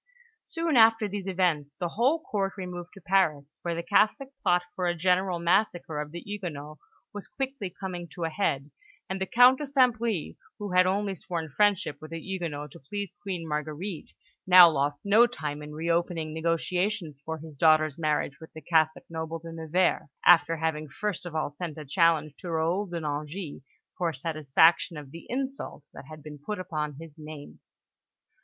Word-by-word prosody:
Soon 330 -5 0
after 225 -1 +6
these 200 -1 -5
events, 170 -7 0
the 175 -3 -3
whole 270 - +1
Court 195 -2 -1
removed 180 -2 -6
to 195 - -12
Paris, 155 -6 +1
where 170 -1 -2
the 170 - -3
Catholic 220 +9 +2
plot 180 0 +3
for 180 -1 -1
a 175 - +1
general 180 +1 +2
massacre 170 -3 +1
of 150 0 -4
the 170 +1 -7
Huguenots 155 -7 -6 0.3
was 205 -1 -6
quickly 265 -7 -4
coming 180 -1 -6
to 175 - -4
a 165 - -1
head; 145 -6 -1 0.4
and 190 0 -4
the 190 - 0
Count 250 +2 +6
de 295 - -4
St. 260 -4 +4
Bris, 225 -8 -2 0.2
who 205 -3 -5
had 180 0 +5
only 200 +1 0
sworn 165 -2 -5
friendship 185 -1 +1
with 155 - -9
the 165 0 -5
Huguenots 160 -6 -5
to - - -12
please 200 +7 -6
Queen 185 -5 -4
Marguerite, 155 +4 -4 0.3
now 180 -1 +10
lost 145 -1 -1
no 220 +4 +6
time 150 -11 -5
in 150 0 -8
reopening 165 0 -1
negotiations 165 0 -1
for 160 +1 -4
his 160 -1 -11
daughter's 155 0 +4
marriage 150 -2 0
with 160 - -11
the 160 - -9
Catholic 155 0 +2
noble, 160 0 -4
De 165 0 -10
Nevers, 165 +1 +1 0.2
after 165 -1 +6
having 155 -1 -2
first 190 +3 -4
of 165 - -8
all 155 -2 -1
sent 160 +1 -6
a 155 - -7
challenge 155 -1 +2
to 180 - -7
Raoul 170 +5 0
de 170 -1 -4
Nangis 150 +2 -4 0.3
for 170 -2 -1
satisfaction 155 +3 +3
of 145 -3 -9
the 165 +2 -11
insult 265 - -4
that - - -10
had 155 0 -11
been 150 -1 -9
put 210 +6 -3
upon 150 -5 -3
his 165 -1 -12
name. 150 -1 -10
170 Hz, 180 wpm, -28 LUFS, 155-195 Hz, 0.4 s, now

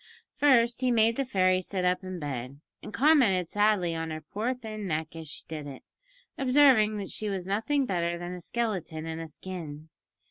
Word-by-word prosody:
First 245 -4 +3
he 255 - +2
made 230 -1 +4
the 275 - -1
fairy 185 -5 +2
sit 185 0 -3
up 180 +1 +1
in 185 -1 -5
bed, 135 -3 -5 0.2
and - - -8
commented 230 - +3
sadly 205 -5 +2
on 165 0 -3
her 155 0 -5
poor 215 +11 -3
thin 215 -4 -6
neck 160 0 -3
as 160 -2 -7
she - - -8
did 155 -2 -6
it, 135 -2 -9 0.6
observing 255 -6 +5
that 200 -2 -5
she 215 - -3
was 190 -3 -3
nothing 225 +9 0
better 170 -4 -1
than 175 +1 -6
a 180 - -7
skeleton 180 -8 -3
in 160 0 -4
a 165 - -6
skin. 155 -2 -8
185 Hz, 190 wpm, -28 LUFS, 165-225 Hz, 0.6 s, observing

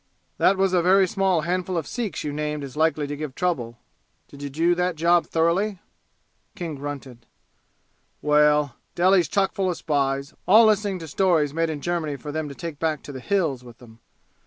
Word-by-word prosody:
"That 195 - +4
was 190 -1 +2
a 180 - +4
very 190 +2 +4
small 190 -4 +1
handful 180 +2 -2
of 160 - -2
Sikhs 230 +1 -4
you 150 - -3
named 150 0 -3
as 135 -1 -8
likely 155 -1 +1
to 145 +1 -5
give 145 -3 -6
trouble. 125 -11 -2 0.5
Did 140 - -13
you 145 - -4
do 165 +5 +2
that 180 0 0
job 170 +2 +3
thoroughly?" 180 +5 +1 0.8
King 170 -3 -5
grunted. 135 -4 -8 0.9
"Well 150 -2 +3 0.2
Delhi's 180 -1 +4
chock 195 +5 +1
full 195 -3 0
of 175 - -2
spies, 140 -2 -1
all 220 +5 +7
listening 210 -2 +2
to 165 -2 -8
stories 160 -3 +1
made 165 +1 0
in 150 -2 -4
Germany 165 -4 -2
for 145 +1 -7
them 155 0 -3
to 140 - -9
take 160 -2 -7
back 160 -2 -1
to - - -8
the 130 - -7
'Hills' 155 -5 -1
with 120 -1 -14
'em. 115 -2 -16
160 Hz, 190 wpm, -24 LUFS, 145-180 Hz, 0.9 s, all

